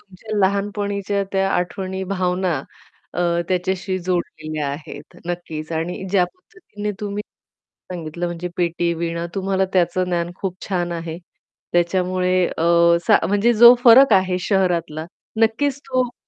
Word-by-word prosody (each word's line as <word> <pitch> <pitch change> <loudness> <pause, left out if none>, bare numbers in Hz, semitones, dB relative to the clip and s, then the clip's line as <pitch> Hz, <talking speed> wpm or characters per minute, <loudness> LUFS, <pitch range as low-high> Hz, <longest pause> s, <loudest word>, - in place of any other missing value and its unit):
तुमच्या 205 +3 -8
लहानपणीच्या 200 0 0
त्या 195 0 +1
आठवणी, 190 +1 -2
भावना 185 -1 0 0.6
अ, - - -4 0.3
त्याच्याशी 185 +1 -1
जोडलेल्या 155 -4 -3
आहेत, 145 +2 -8
नक्कीच. 165 -3 -5
आणि 165 +4 -3
ज्या 190 -2 +4
पद्धतीने 355 - -8
तुम्ही 205 0 -3 0.7
सांगितलं, 170 0 -4
म्हणजे 175 0 -4
पेटी, 170 0 0
वीणा 170 0 -3
तुम्हाला 190 0 0
त्याचं 185 0 +2
ज्ञान 175 -1 -1
खूप 190 -2 -2
छान 175 -2 -1
आहे, 165 -1 -5 0.6
त्याच्यामुळे 180 +1 +1 0.2
अ, - - 0 0.4
सा - - +7
म्हणजे 205 +4 +3
जो 235 +2 +9
फरक 245 +1 +8
आहे 185 -1 +3
शहरातला, 175 -5 0 0.4
नक्कीच 260 +5 +1
तो 255 -1 +2
दिसतो. 245 - -10
185 Hz, 130 wpm, -21 LUFS, 175-200 Hz, 0.7 s, जो